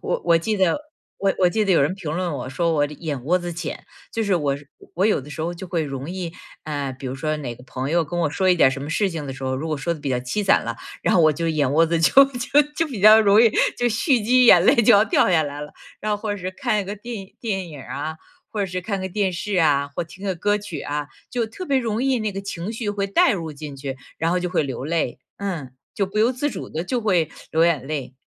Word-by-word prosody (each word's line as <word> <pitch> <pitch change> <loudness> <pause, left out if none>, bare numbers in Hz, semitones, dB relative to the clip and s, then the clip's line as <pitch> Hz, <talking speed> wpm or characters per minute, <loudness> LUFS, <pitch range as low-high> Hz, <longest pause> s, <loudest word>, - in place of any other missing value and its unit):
我 - - -2
我 170 -1 +6
记 190 +7 -1
得 190 - +2 0.4
我 195 -1 +1
我 180 -2 +5
记 215 +4 0
得 195 - +2
有 170 - +4
人 150 +7 +1
评 165 -5 -5
论 180 -1 -1
我， 130 -2 -5
说 165 +4 0
我 145 -2 +3
眼 145 -3 -5
窝 175 +6 +3
子 175 -1 -5
浅， 165 -2 -6 0.3
就 225 - -1
是 200 -3 +1
我 145 -5 +1 0.4
我 185 +4 +2
有 215 - +3
的 145 +2 -9
时 155 - -6
候 170 +2 -2
就 180 +2 -8
会 170 -2 -1
容 140 +1 -5
易， 180 -2 -4 0.3
呃， 145 -3 -3
比 130 +1 -8
如 130 - -3
说 155 +3 -2
哪 125 -5 -5
个 125 - -16
朋 130 +1 -4
友 170 0 +2
跟 175 +3 -3
我 160 - +2
说 185 +5 +1
一 - - +5
点 140 -6 +5
什 135 +1 -5
么 145 - -5
事 200 +4 +1
情 160 -5 -5
的 135 - -4
时 135 0 -10
候， 130 0 -1
如 145 +5 -4
果 155 - -1
说 170 +5 -1
的 155 - -11
比 140 -2 -3
较 125 - +1
凄 125 +12 -2
惨 195 - +4
了， - - -4 0.2
然 - - +1
后 175 - +5
我 155 -1 +5
就 165 +2 -2
眼 145 -4 +1
窝 165 +3 +4
子 165 +1 +1
就 215 +11 +7
就 275 +2 +2 0.2
就 330 - +1
比 255 -9 -6
较 215 +2 +9
容 210 -1 +5
易 230 - +6 0.3
就 245 - +2
蓄 240 +3 +2
积 250 +4 +4
眼 175 -7 +8
泪 - - +5
就 230 -2 +6
要 200 - +7
掉 200 - +3
下 165 -3 +4
来 145 0 -5
了， 150 - -9 0.3
然 215 0 -1
后 205 - -1
或 215 0 -4
者 205 - -1
是 185 -1 -4
看 200 +3 -1
一 - - -9
个 200 +2 -5
电 210 -2 -7
电 190 -6 -2
影 145 -3 -9
儿 - - -14
啊， 155 +3 -4 0.3
或 215 - -3
者 200 - +1
是 185 0 -4
看 195 +1 -3
个 190 - -3
电 190 0 0
视 195 +3 -3
啊， 145 -4 +3
或 - - -2
听 185 +4 -12
个 190 -2 -1
歌 205 +4 +1
曲 200 -5 -6
啊， 145 0 -3 0.2
就 240 -2 0
特 225 +12 -8
别 275 -2 +2
容 230 -1 -1
易 265 -2 +2
那 215 - -1
个 195 - -4
情 195 0 -5
绪 225 -2 -4
会 200 -1 -2
带 195 - +4
入 165 -5 -4
进 145 -1 -8
去， 135 -1 -5 0.2
然 165 +1 +1
后 180 - +2
就 180 - -2
会 180 - +2
流 130 -3 -5
泪， 160 -6 -1 0.2
嗯， 170 -10 -4 0.2
就 200 - 0
不 200 +3 -4
由 225 +3 +4
自 290 +4 -1
主 - - -7
地 160 - -3
就 245 +7 -1
会 185 -8 +1 0.2
流 160 +1 +3
眼 160 -6 +1
泪。 140 -4 -4
175 Hz, 305 characters per minute, -22 LUFS, 150-205 Hz, 0.4 s, 较